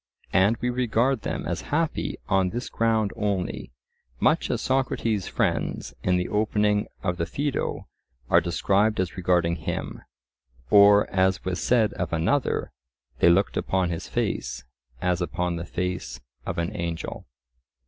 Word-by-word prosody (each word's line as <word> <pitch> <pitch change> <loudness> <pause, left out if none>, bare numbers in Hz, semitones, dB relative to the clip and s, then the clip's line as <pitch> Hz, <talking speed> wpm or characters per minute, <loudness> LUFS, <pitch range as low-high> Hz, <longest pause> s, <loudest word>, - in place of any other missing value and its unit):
And 100 +5 +4
we 125 +2 -1
regard 125 0 +1
them - - -3
as - - -2
happy 160 +1 -1
on 95 -1 +2
this 120 +5 -4
ground 110 -3 +1
only, 100 - -2 0.5
much - - +2
as - - 0
Socrates' 115 -6 0
friends - - -1
in 90 0 +2
the 90 - -1
opening 105 0 +1 0.2
of 90 -1 -1
the 85 0 -1
Phaedo 145 +3 -2 0.4
are - - +5
described 100 +5 +1
as 95 -1 -1
regarding 85 -2 +1
him; 80 - -4 0.7
or 100 0 +7
as 95 -1 +1
was 95 -1 -2
said 115 -4 +3
of 90 -2 -3
another, 90 - 0 0.5
"they - - +6
looked 95 +4 +3
upon 95 -2 0
his 85 - -4
face - - -2 0.4
as 90 0 +1
upon 90 0 -1
the 85 - -5
face 90 +1 -3 0.3
of - - -3
an 85 +5 -2
angel." 85 -3 -4
95 Hz, 145 wpm, -25 LUFS, 90-110 Hz, 0.7 s, or